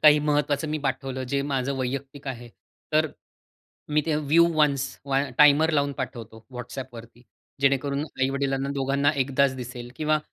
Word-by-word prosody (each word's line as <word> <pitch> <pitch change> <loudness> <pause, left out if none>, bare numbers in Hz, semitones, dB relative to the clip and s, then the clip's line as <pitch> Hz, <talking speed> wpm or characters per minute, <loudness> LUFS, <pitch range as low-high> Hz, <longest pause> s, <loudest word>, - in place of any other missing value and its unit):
काही 150 -1 +8
महत्वाचं 150 0 0
मी 155 0 -1
पाठवलं 135 -1 -3
जे 140 +1 0
माझं 140 -1 -1
वैयक्तिक 135 +2 -4
आहे. 120 -2 -6 0.4
तर 155 +1 +4
अ, - - -12 0.8
मी 150 - +4
ते 160 - +1
व्ह्यू 155 +3 +4
वन्स 140 -3 +3 0.2
व 135 - -1 0.2
टाइमर 150 +2 +6
लावून 140 -1 +1
पाठवतो, 110 -1 -6
WhatsAppवरती. 120 -1 -8 0.4
जेणेकरून 140 +1 +1
आई-वडिलांना 135 -1 -1
दोघांना 140 +1 +2
एकदाच 135 0 +2
दिसेल. 120 -1 -7
किंवा 155 0 +2
140 Hz, 145 wpm, -25 LUFS, 130-150 Hz, 0.8 s, काही